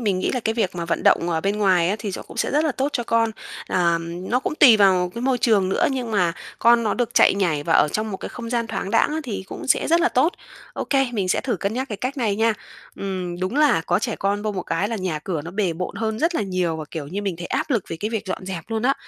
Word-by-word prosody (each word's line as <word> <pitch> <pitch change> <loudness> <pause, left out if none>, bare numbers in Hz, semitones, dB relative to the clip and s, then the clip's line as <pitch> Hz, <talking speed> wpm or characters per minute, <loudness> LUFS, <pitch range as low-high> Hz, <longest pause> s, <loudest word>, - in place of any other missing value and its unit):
mình 200 -5 0
nghĩ - - 0
là 250 - -1
cái 220 0 -1
việc 205 -6 0
mà 170 -1 -3
vận 165 0 -2
động 175 - +3
ở 160 -1 0
bên 200 +3 -1
ngoài 185 -4 +3
á 205 - 0
thì 200 -1 -4
nó - - -5
cũng - - -13
sẽ - - 0
rất 300 +2 +2
là 300 - +1
tốt 270 +3 -1
cho 240 - -1
con. 230 -1 +2 0.4
Ờm, 170 +1 -1
nó 250 +1 +2
cũng 305 - -3
tùy 255 -8 +7
vào 185 -3 +4
cái 235 - -5
môi 260 -1 +1
trường 205 -6 +3
nữa, - - +2
nhưng 250 -4 -3
mà 180 -5 +2 0.3
con 235 0 +5
nó 215 - 0
được 245 -2 -2
chạy - - +6
nhảy 170 -7 0
và - - 0
ở - - +5
trong 215 +7 -2
một 190 - -3
cái - - -7
không 230 -1 -7
gian 235 -2 0
thoáng 200 -2 -4
đãng - - +3
á 315 +1 -2
thì 205 -6 -4
cũng - - -8
sẽ - - +2
rất 335 +2 +4
là 350 - +3
tốt. 295 +8 +2 0.4
Ô - - -4
kê, 270 -2 +2
mình 195 -5 -1
sẽ - - +2
thử 240 -6 -2
cân 200 +4 -2
nhắc 260 +2 -2
cái 210 - -4
cách 255 +7 -4
này 215 -5 0
nha. 225 0 +3 0.4
Ừm, 185 -2 -4
đúng 190 +9 -2
là 295 - +4
có 175 +1 +2
trẻ 225 0 -3
con 200 +1 -1
vô 215 -1 -1
một 185 -2 -3
cái 185 +5 -1
là 230 - -2
nhà 185 -5 -2
cửa 155 -1 -4
nó 170 - -7
bề 190 -2 0
bộn 180 +2 -5
hơn 220 -1 -2
rất 330 +4 +1
là 215 - 0
nhiều 185 -4 -1
và 155 - -5
kiểu 155 -4 -5
như 195 +7 -4
mình 190 -4 -2
thấy 175 - -6
áp - - -2
lực 230 -8 +1
về 165 - -4
cái 215 +2 -2
việc 220 -2 -3
dọn 185 0 -4
dẹp 180 -4 -5
luôn 225 0 -2
á. 270 +2 +3
205 Hz, 305 wpm, -22 LUFS, 180-235 Hz, 0.4 s, tùy